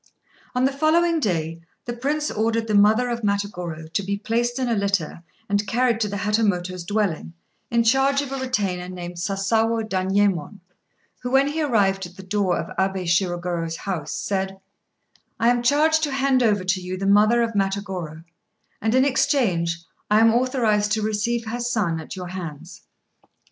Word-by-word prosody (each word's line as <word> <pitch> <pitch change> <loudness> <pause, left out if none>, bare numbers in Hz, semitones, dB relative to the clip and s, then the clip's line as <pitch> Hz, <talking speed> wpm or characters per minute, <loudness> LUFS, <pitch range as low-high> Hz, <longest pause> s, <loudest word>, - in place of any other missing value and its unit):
On 250 +1 +2
the 270 - +2
following 325 +4 +2
day, 165 - -2 0.2
the 240 - -3
Prince 295 +5 -1
ordered 225 +1 0
the 215 - -2
mother 215 +4 +4
of 235 0 -3
Matagorô 180 -6 -2
to - - +1
be 200 +1 -2
placed 235 +3 -1
in 260 -1 -1
a 235 - +1
litter 200 -6 -1 0.3
and 205 0 0
carried 240 -1 +1
to 215 - +1
the 205 0 -4
Hatamoto's 195 -4 0
dwelling, 195 -4 -1 0.4
in 235 0 +2
charge 270 +4 +3
of 275 - -7
a 270 - -3
retainer 200 -9 -2
named 175 -1 -7
Sasawo 220 +5 0
Danyémon, 195 -2 0 0.6
who, 245 - -3
when 270 +2 +3
he 315 +2 -2
arrived 195 -9 +1
at 175 - -17
the 190 - -10
door 190 -2 0
of - - -5
Abé 190 -1 0
Shirogorô's 175 -2 0
house, 170 -7 -4
said 190 -1 -2 0.8
"I 230 - +4
am 240 0 +2
charged 305 +5 +3
to 300 -2 0
hand 270 -1 +2
over 210 -5 +2
to 185 0 0
you 180 +1 -5
the 195 - -3
mother 215 +4 +4
of 230 - -1
Matagorô, 195 -5 -3 0.6
and, 220 +3 +1
in 260 +1 +5
exchange, 190 - +1 0.3
I 210 +1 +5
am 225 0 +5
authorized 230 -5 +1
to 215 -1 0
receive 220 +2 -1
her 230 +2 -4
son 215 -9 0
at 160 - -8
your 180 -1 -6
hands." 170 -2 -8
205 Hz, 175 wpm, -23 LUFS, 185-240 Hz, 0.8 s, in